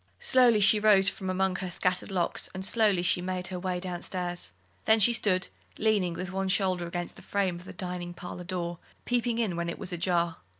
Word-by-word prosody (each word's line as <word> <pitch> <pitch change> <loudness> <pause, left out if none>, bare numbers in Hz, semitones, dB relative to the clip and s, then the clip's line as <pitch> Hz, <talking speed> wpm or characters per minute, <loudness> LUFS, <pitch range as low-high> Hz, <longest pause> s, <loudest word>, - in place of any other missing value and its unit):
Slowly 245 -4 +4
she 210 +2 +5
rose 200 -2 +5
from 190 - -5
among 190 0 0
her 185 -1 -4
scattered 180 +1 -1
locks, 185 -3 0
and 190 0 -3
slowly 205 -5 +3
she 180 0 +2
made 185 0 -3
her 185 -1 -4
way 180 -1 -2
down 180 -1 -5
stairs. 175 - -3 0.3
Then 220 0 +5
she 235 +3 +6
stood 185 -5 +1 0.3
leaning 205 -6 +1
with 180 +1 -5
one 190 0 -2
shoulder 185 -3 +1
against 175 0 -5
the - - -11
frame 190 -3 -1
of 180 - -14
the - - -9
dining 180 -2 -5
parlour 180 0 -7
door, 175 -1 -3 0.3
peeping 240 -1 0
in 220 -7 0
when 170 0 -2
it - - -5
was 180 - -5
ajar. 170 -1 +1
185 Hz, 210 wpm, -28 LUFS, 175-200 Hz, 0.3 s, she